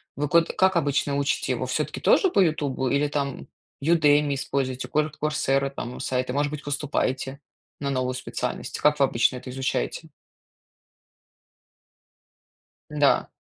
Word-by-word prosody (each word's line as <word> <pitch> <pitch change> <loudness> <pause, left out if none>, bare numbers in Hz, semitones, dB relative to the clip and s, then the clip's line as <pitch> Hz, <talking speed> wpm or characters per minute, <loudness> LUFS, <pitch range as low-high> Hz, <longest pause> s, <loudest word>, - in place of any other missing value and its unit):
Вы 150 +1 -1
ко 170 +3 +5
как 190 +2 +1
обычно 145 -2 +1
учите 140 0 0
его, - - -2
всё-таки - - -2
тоже 380 -3 +4
по - - +2
"Ютубу" 145 -6 +1
или 140 +2 +2
там 140 -2 -3 0.4
Udemy 150 -2 +4
используйте, 135 -1 -2
кур 150 0 0
Coursera 140 -2 +1
там 125 -2 -7
сайты, 125 0 -2
может 145 +1 0
быть, 150 0 -6
поступаете 140 -2 -2 0.4
на 140 -1 -2
новую 130 -1 -1
специальность? 130 - -4
Как 150 0 +3
вы 140 - +6
обычно 125 0 +1
это 125 0 -8
изучаете? 130 - -2 2.8
Да. 145 -2 +2
140 Hz, 135 wpm, -25 LUFS, 130-150 Hz, 2.8 s, вы